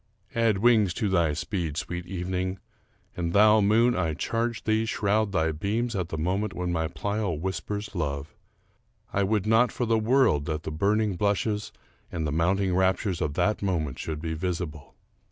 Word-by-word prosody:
Add 115 -3 +2
wings 105 -4 +4
to 105 -4 0
thy 85 -5 +2
speed, 85 -2 -3
sweet 85 +1 -4
evening; 95 +1 -2 0.6
and 85 -2 -2
thou, 105 +1 +6
moon, 115 +4 +4
I 80 -4 0
charge 115 +6 -2
thee, 110 +1 +1
shroud 105 -1 +1
thy 80 -4 +1
beams 110 +9 -2
at 90 -4 -2
the 80 - -4
moment 95 +5 -1
when 90 0 -2
my 80 -2 0
Pleyel 100 +1 -2
whispers 100 +4 -4
love, 75 -4 -3 0.8
I 100 - +1
would 100 0 +1
not 115 +3 +4
for 125 - -2
the 115 -1 +2
world 115 - +3
that 75 0 -3
the - - -4
burning 100 +4 +1
blushes 105 +1 0 0.4
and 80 -2 -2
the 75 - -1
mounting 90 +4 +1
raptures 95 0 +1
of 75 -1 -1
that 105 - +1
moment 80 -9 -1
should 80 -1 -4
be 80 -1 -2
visible. 80 -3 -4
95 Hz, 170 wpm, -27 LUFS, 85-105 Hz, 0.8 s, thou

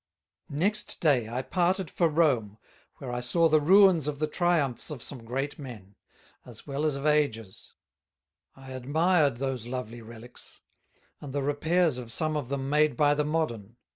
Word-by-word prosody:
Next 200 +9 -1
day 130 -9 +2
I 125 +3 -3
parted 180 +1 0
for 170 -2 +2
Rome, 130 -10 +1 0.4
where 130 - -7
I 125 - -2
saw 165 +8 +2
the 155 -1 +3
ruins 185 -2 +5
of 150 -1 -3
the 155 - 0
Triumphs 155 -6 0
of 145 -6 -6
some 130 -5 -5
great 135 +6 -4
men, 110 -8 -10 0.5
as 115 -3 -12
well 145 +1 -3
as 150 -3 0
of 140 +1 -5
Ages: 140 -10 -1 0.8
I 135 -1 -12
admired 145 +2 +1
those 130 -3 -3
lovely 120 -2 -6
Relicks; 115 +2 -12 0.6
and 140 -3 -9
the 140 -1 -1
Repairs 155 +1 +1
of 120 -2 -6
some 155 +5 +1
of 145 -5 -3
them 135 -1 -3
made 150 +1 +2
by 145 -2 +4
the 150 0 0
Modern. 120 -9 -3
140 Hz, 170 wpm, -27 LUFS, 125-155 Hz, 0.8 s, ruins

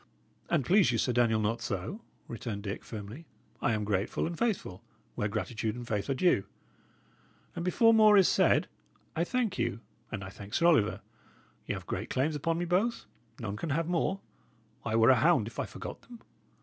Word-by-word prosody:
"An't 135 - +1
please 190 -4 +4
you, 115 - 0
Sir 125 - +1
Daniel, 115 -2 +3
not 115 +2 -1
so," 100 - -4 0.3
returned 110 -3 -5
Dick, 100 +1 -5
firmly. 110 +8 -8 0.3
"I 120 - +2
am 105 -1 -1
grateful 100 -1 -1
and 170 - -3
faithful, 185 - -2 0.3
where 105 - -1
gratitude 110 +1 -3
and 120 -1 -7
faith 105 -1 -2
are 135 - +1
due. 130 - +2 1.1
And 170 - -3
before 225 +6 +4
more 215 -2 +7
is 190 - +6
said, - - +3 0.5
I 165 - +1
thank 225 0 -1
you, 105 - -1 0.3
and 105 -3 -4
I 95 - -7
thank 100 +1 -8
Sir 170 - +2
Oliver; 145 -12 +3 0.7
y' - - -1
have - - -8
great - - -4
claims 150 +4 0
upon 165 +3 -1
me 175 - -1
both 195 +7 0 0.3
none 105 -4 -4
can 165 - -4
have 160 +3 0
more; 180 +3 0 0.6
I 110 - -1
were 115 +3 +6
a 130 - +5
hound 155 -6 +4
if 115 - -8
I - - -1
forgot - - -8
them." 240 -1 -13
125 Hz, 190 wpm, -30 LUFS, 110-175 Hz, 1.1 s, more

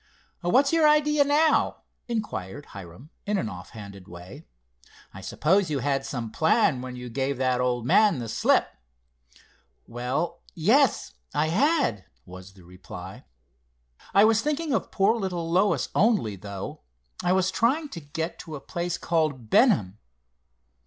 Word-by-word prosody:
"What's 260 - +3
your 320 -2 +5
idea 300 -1 +4
now?" 300 +2 +2 0.2
inquired 145 - -4
Hiram 100 - -11 0.2
in 210 0 +1
an 110 - -2
off 90 0 -9
handed 100 -4 -11
way. 90 - -12 0.7
"I - - -10
suppose 185 +4 +1
you 150 - -1
had 135 0 -1
some 115 -4 -5
plan 160 - +2
when 130 0 -7
you 125 0 -7
gave 135 +3 -2
that 130 -1 +1
old 120 -2 -1
man 205 - +4
the 120 -2 -5
slip?" 110 - +2 1.2
"Well, 125 +8 -3
yes, 215 - +2 0.2
I 155 +1 +1
had," 265 - +1 0.2
was 95 +1 -12
the 95 - -17
reply. 90 +1 -11 0.9
"I 200 +2 +6
was 220 0 +3
thinking 300 0 -1
of 225 - -1
poor 200 +3 +2
little 175 -5 -3
Lois 190 +4 +2
only, 200 - +2
though. 100 0 -8 0.4
I 180 - +2
was 190 0 +1
trying 280 +9 +1
to 170 - -7
get 160 +3 -5
to 160 - -8
a - - -6
place 175 +4 -4
called 155 -9 -1
Benham." 180 - +3
155 Hz, 145 wpm, -26 LUFS, -, 1.2 s, I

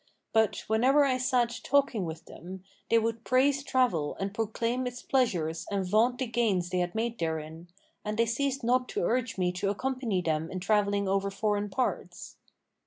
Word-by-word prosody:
But, 220 -1 +2
whenever 260 +7 +4
I 255 -2 +1
sat 245 -2 +1
talking 275 -8 +2
with 165 0 -7
them, 185 +2 -10 0.3
they 230 - +5
would 225 0 -1
praise 270 +3 +3
travel 225 - +1
and 195 +1 -3
proclaim 230 +3 -1
its 245 0 -7
pleasures 175 -12 0
and 195 -2 -1
vaunt 225 +6 +3
the 260 - -1
gains 215 -7 0
they 180 - +1
had 175 +1 -2
made 230 +1 -2
therein; 160 +1 -4 0.4
and 210 0 -3
they 230 - +4
ceased 270 +3 -1
not 250 +2 +2
to - - -2
urge 245 +4 0
me 180 -1 +1
to 180 +2 -2
accompany 235 -3 -1
them 160 0 -1
in 185 - -4
travelling 200 0 +1
over 195 +1 +1
foreign 205 0 -1
parts." 255 +6 -3
220 Hz, 175 wpm, -29 LUFS, 185-250 Hz, 0.4 s, they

